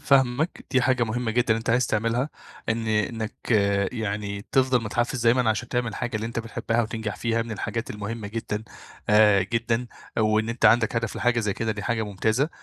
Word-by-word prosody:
فاهمك 140 +2 +2
دي 130 -2 +3
حاجة 125 -1 +2
مهمة 115 +1 -2
جدًا 120 -1 +2
أنت 115 0 -2
عايز 125 +2 +3
تعملها، 115 +5 0 0.4
إن 115 0 0
إنك 110 +1 -2 0.4
يعني 100 -3 -3
تفضل 130 -2 +3
متحفز 120 +3 -1
دايمًا 120 -1 +4
عشان 115 +2 -2
تعمل 120 -3 -1
حاجة 120 -2 -2
اللي 110 +1 -3
أنت 115 - -4
بتحبها 115 0 -1
وتنجح 110 -2 -4
فيها 115 -1 0
من 115 - -9
الحاجات 115 +2 -3
المهمة 105 0 -5
جدًا 110 -1 -4 0.4
آآ 105 -2 +6
جدًا 115 +3 -1 0.3
وإن 110 +1 +2
أنت 115 +1 -3
عندك 115 0 +5
هدف 115 -1 -2
لحاجة 120 0 +2
زي 105 -2 0
كده 110 -1 -1
دي 105 -1 -6
حاجة 115 0 0
ممتازة، 110 - 0
115 Hz, 180 wpm, -25 LUFS, 110-120 Hz, 0.4 s, آآ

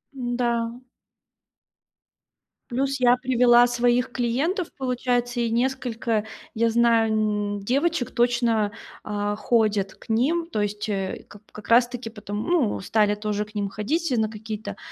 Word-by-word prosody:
М-да. 240 -2 -1 2.0
Плюс 270 +2 -1
я 245 0 +5
привела 245 -1 +5
своих 245 0 +1
клиентов, 285 - -1
получается, 245 -1 -1
и 235 - 0
несколько 235 -3 -1 0.3
я 230 +1 +2
знаю, 230 -1 +3
м, 210 -1 0
девочек 270 +5 0
точно, 235 -3 +1 0.3
э, 205 0 -2
ходят 215 -5 +1
к - - -18
ним. 290 +10 +1
То 215 - -1
есть, 205 +1 -3
э, 195 -2 -3
как 205 - -14
как 215 - -11
раз 240 +1 +5
таки 245 -2 -6
потом, 210 -1 -5
ну, 325 -11 +1
стали 210 +1 +2
тоже 210 0 -2
к 210 +1 -16
ним 205 -1 -1
ходить 275 +10 -2
на 220 -1 +1
какие-то, 215 0 -7
235 Hz, 135 wpm, -24 LUFS, 210-250 Hz, 2.0 s, я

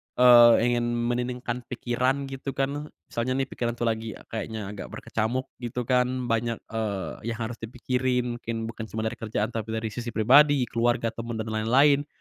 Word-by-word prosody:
eee, 120 -2 +8 0.2
ingin 120 0 +1
menenangkan 120 +1 -2
pikiran 125 +3 0
gitu 135 0 -5
kan, 140 +2 -2 0.2
misalnya 125 +2 -1
nih - - -6
pikiran 120 -1 -2
tuh 120 - -4
lagi 110 -1 -1 0.2
kayaknya 110 -2 -4
agak 100 - -7
berkecamuk 115 +4 -3
gitu 120 0 -3
kan, 125 +1 +1
banyak, 115 0 -1
eee, 110 -1 -3
yang 115 -1 -2
harus 115 +1 -5
dipikirin 125 +1 -1
mungkin 115 -1 -4
bukan 110 -1 -7
cuma 110 +1 -4
dari 110 - -3
kerjaan, 110 +1 -2
tapi 110 0 -4
dari 110 -1 -3
sisi 120 +2 -6
pribadi, 135 +4 +6
keluarga, 115 -1 +1
temen, 115 0 -5
dan 110 0 -4
lain-lain. 140 +7 +3
120 Hz, 165 wpm, -26 LUFS, 110-125 Hz, 0.2 s, eee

